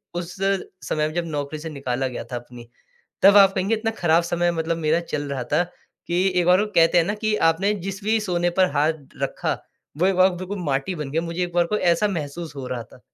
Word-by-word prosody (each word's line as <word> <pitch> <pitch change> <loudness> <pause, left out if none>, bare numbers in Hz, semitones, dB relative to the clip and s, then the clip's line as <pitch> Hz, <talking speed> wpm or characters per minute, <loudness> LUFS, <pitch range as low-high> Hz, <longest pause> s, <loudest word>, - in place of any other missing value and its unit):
उस 175 0 -5
समय 185 -5 -1
में 155 - -6
जब 175 -1 -1
नौकरी 150 0 -4
से 160 +1 -6
निकाला 135 -3 -2
गया 125 - -5
था - - -3
अपनी, 120 -1 -9 0.5
तब 200 +1 +8
आप 195 -1 +7
कहेंगे 195 +4 +1
इतना 225 +1 -1
खराब 170 0 +3
समय 175 0 +1
मतलब 165 0 -1
मेरा 160 +1 +1
चल 145 - -1
रहा 130 -3 -3
था, 155 +4 +4 0.5
कि 175 +2 +2
एक 175 - 0
बार 180 +1 +6
को - - -5
कहते 165 +1 +5
हैं 165 - +4
ना 205 - -1
कि 215 0 -1
आपने 190 +6 +2
जिस 195 +1 -5
भी 220 +1 +2
सोने 175 -3 0
पर 185 -4 +4
हाथ 150 +1 +1 0.2
रखा - - -1 0.5
वो 180 - +3
एक 195 - +2
बार 185 +1 +6
बिल्कुल 185 +3 -5
माटी 140 +5 -1
बन 150 -3 -5
गया। 160 +3 0
मुझे 170 +1 -3
एक 175 - -7
बार 175 - +4
को - - +3
ऐसा 175 +4 +2
महसूस 160 -2 -5
हो 130 -2 -5
रहा 120 -2 -3
था। 125 - -18
170 Hz, 240 wpm, -23 LUFS, 150-185 Hz, 0.5 s, तब